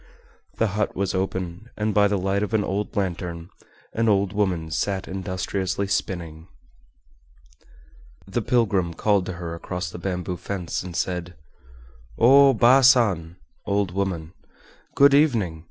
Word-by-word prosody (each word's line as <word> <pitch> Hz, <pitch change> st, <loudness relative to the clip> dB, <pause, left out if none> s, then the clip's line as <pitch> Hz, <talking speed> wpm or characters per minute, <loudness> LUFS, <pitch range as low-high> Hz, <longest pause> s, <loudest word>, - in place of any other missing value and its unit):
The 115 Hz, -, +1 dB
hut 105 Hz, 0 st, -1 dB
was 95 Hz, 0 st, -1 dB
open, 95 Hz, +2 st, -3 dB
and 105 Hz, 0 st, -1 dB
by 100 Hz, 0 st, +4 dB
the 100 Hz, 0 st, 0 dB
light 95 Hz, +2 st, 0 dB
of 105 Hz, +1 st, -1 dB
an 105 Hz, -, +2 dB
old 100 Hz, +4 st, -3 dB
lantern 85 Hz, -3 st, -3 dB, 0.4 s
an 115 Hz, 0 st, +1 dB
old 100 Hz, -1 st, +2 dB
woman 90 Hz, -6 st, -1 dB
sat 95 Hz, +4 st, -2 dB
industriously 95 Hz, +1 st, -3 dB
spinning. 85 Hz, -4 st, -3 dB, 1.8 s
The 100 Hz, +5 st, -2 dB
pilgrim 100 Hz, -8 st, +1 dB
called 100 Hz, 0 st, +1 dB
to 90 Hz, -, -4 dB
her 85 Hz, -1 st, -6 dB
across 90 Hz, +1 st, -5 dB
the -, -, -8 dB
bamboo 90 Hz, -1 st, -3 dB
fence 90 Hz, -1 st, -4 dB
and 90 Hz, -2 st, -8 dB
said: 90 Hz, -1 st, -3 dB, 0.8 s
"O 135 Hz, +3 st, +7 dB
Baa 125 Hz, +5 st, +6 dB
San 105 Hz, -11 st, +3 dB, 0.3 s
(old 100 Hz, -2 st, 0 dB
woman), 90 Hz, -4 st, -3 dB, 0.6 s
good 140 Hz, 0 st, +6 dB
evening! 115 Hz, -, +2 dB
95 Hz, 140 wpm, -24 LUFS, 90-105 Hz, 1.8 s, O